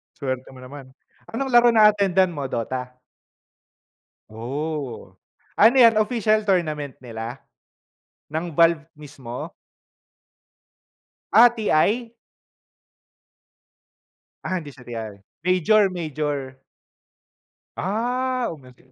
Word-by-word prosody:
Swerte 130 Hz, -1 st, -4 dB
mo 130 Hz, -, -12 dB
naman, 130 Hz, 0 st, -12 dB, 0.3 s
anong 265 Hz, +3 st, -4 dB
laro 240 Hz, 0 st, +6 dB
na-attendan 200 Hz, -4 st, +4 dB
mo, 145 Hz, -4 st, -4 dB
Dota? 125 Hz, +1 st, -4 dB, 1.3 s
Oh, 135 Hz, +4 st, -5 dB, 0.4 s
ano 225 Hz, +5 st, +5 dB
yan 230 Hz, -3 st, +6 dB
official 215 Hz, -1 st, +1 dB
tournament 155 Hz, -7 st, -1 dB
nila, 115 Hz, +1 st, -8 dB, 0.8 s
ng 160 Hz, +2 st, -4 dB
Valve 165 Hz, 0 st, +3 dB
mismo? 140 Hz, -5 st, -9 dB, 1.8 s
Ah, 235 Hz, +3 st, +8 dB
TI? 225 Hz, +1 st, 0 dB, 2.3 s
Ah, 185 Hz, -, -2 dB
hindi 150 Hz, -4 st, -10 dB
siya 130 Hz, -, -15 dB
TI 115 Hz, -3 st, -6 dB, 0.3 s
major-major. 160 Hz, -8 st, 0 dB, 1.2 s
Ah, 245 Hz, +5 st, -1 dB
umattend 130 Hz, -3 st, -19 dB
155 Hz, 80 wpm, -23 LUFS, 130-215 Hz, 2.3 s, Ah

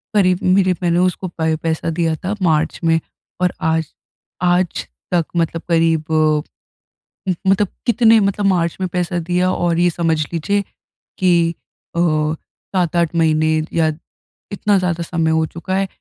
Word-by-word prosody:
करीब 185 Hz, -3 st, +3 dB
मेरे 185 Hz, 0 st, +3 dB
मैंने 170 Hz, 0 st, +2 dB
उसको 185 Hz, +1 st, 0 dB
पै 160 Hz, -2 st, -1 dB
पैसा 165 Hz, 0 st, -1 dB
दिया 165 Hz, 0 st, 0 dB
था 200 Hz, +3 st, -1 dB
मार्च 160 Hz, -3 st, +1 dB
में 165 Hz, 0 st, +3 dB, 0.4 s
और 180 Hz, -1 st, +2 dB
आज 160 Hz, 0 st, +1 dB, 0.6 s
आज 180 Hz, 0 st, +1 dB, 0.3 s
तक 170 Hz, -2 st, +2 dB
मतलब 165 Hz, 0 st, 0 dB
करीब 165 Hz, -2 st, +2 dB, 1.4 s
मतलब 195 Hz, +1 st, +3 dB, 0.2 s
कितने 230 Hz, -2 st, +5 dB
मतलब 200 Hz, 0 st, 0 dB
मार्च 170 Hz, -4 st, +1 dB
में 185 Hz, -, -1 dB
पैसा 180 Hz, 0 st, -1 dB
दिया 180 Hz, +2 st, 0 dB
और 170 Hz, -2 st, 0 dB
ये 175 Hz, 0 st, +3 dB
समझ 165 Hz, -1 st, 0 dB
लीजिए। 200 Hz, +5 st, 0 dB, 0.6 s
कि 170 Hz, -3 st, +3 dB, 0.4 s
अ, -, -, 0 dB
7-8 170 Hz, +1 st, -1 dB
महीने 155 Hz, -1 st, +2 dB, 0.3 s
या 165 Hz, -1 st, +2 dB, 0.6 s
इतना 200 Hz, 0 st, +1 dB
ज़्यादा 175 Hz, -2 st, -1 dB
समय 165 Hz, -1 st, 0 dB
हो 160 Hz, 0 st, +2 dB
चुका 170 Hz, +4 st, -5 dB
है। 195 Hz, 0 st, +1 dB
170 Hz, 140 wpm, -19 LUFS, 165-185 Hz, 1.4 s, कितने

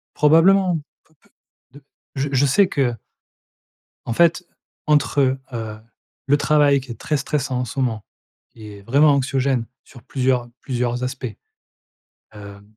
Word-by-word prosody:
Probablement. 175 Hz, +3 st, +4 dB, 0.3 s
P -, -, -33 dB
p -, -, -29 dB, 0.5 s
d -, -, -31 dB, 0.3 s
je 140 Hz, +1 st, -2 dB
je 135 Hz, +1 st, +3 dB
sais 190 Hz, +9 st, +3 dB
que 130 Hz, -8 st, -1 dB, 1.1 s
en 115 Hz, -, -2 dB
fait 170 Hz, +5 st, +2 dB, 0.4 s
entre, 135 Hz, -2 st, +2 dB, 0.2 s
heu, 110 Hz, -2 st, -6 dB, 0.5 s
le 145 Hz, +1 st, +4 dB
travail 145 Hz, -2 st, +3 dB
qui 130 Hz, -1 st, -10 dB
est 115 Hz, -, -9 dB
très 150 Hz, -, -1 dB
stressant, 140 Hz, -2 st, -2 dB
en -, -, -2 dB
ce 130 Hz, -, -6 dB
moment 115 Hz, -5 st, -1 dB, 0.5 s
et 105 Hz, -2 st, -11 dB
vraiment 140 Hz, +8 st, +4 dB
anxiogène, 135 Hz, -2 st, 0 dB, 0.2 s
sur 120 Hz, -, -15 dB
plusieurs 125 Hz, -2 st, -1 dB
plusieurs 125 Hz, -1 st, -2 dB
aspects, 130 Hz, +1 st, -4 dB, 1.1 s
heu, 100 Hz, -1 st, -11 dB
135 Hz, 135 wpm, -21 LUFS, 120-145 Hz, 1.1 s, Probablement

